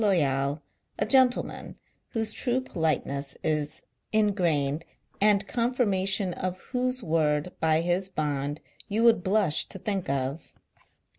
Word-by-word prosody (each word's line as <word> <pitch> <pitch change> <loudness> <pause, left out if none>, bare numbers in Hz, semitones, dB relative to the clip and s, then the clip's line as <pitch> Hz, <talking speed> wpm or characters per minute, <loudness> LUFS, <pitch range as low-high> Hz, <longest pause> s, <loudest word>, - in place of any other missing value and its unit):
Loyal 145 -6 +1 0.3
a - - +1
gentleman 255 +1 +2 0.4
whose 220 -1 -1
true 250 0 +1
politeness 155 - -2
is 150 -1 -1 0.3
in 215 -2 +3
grain, 155 -6 +1 0.4
and 205 -1 +4
confirmation, 200 -6 +1
of 185 +1 -3
whose 255 +2 -2
word 155 0 +1
by 160 0 +3
his 175 +3 0
bond 145 -3 -2 0.3
you 215 +3 0
would 230 -6 +5
blush 190 -4 +2
to - - -6
think 195 -4 -2
of. 140 +3 -3
180 Hz, 125 wpm, -27 LUFS, 150-215 Hz, 0.4 s, would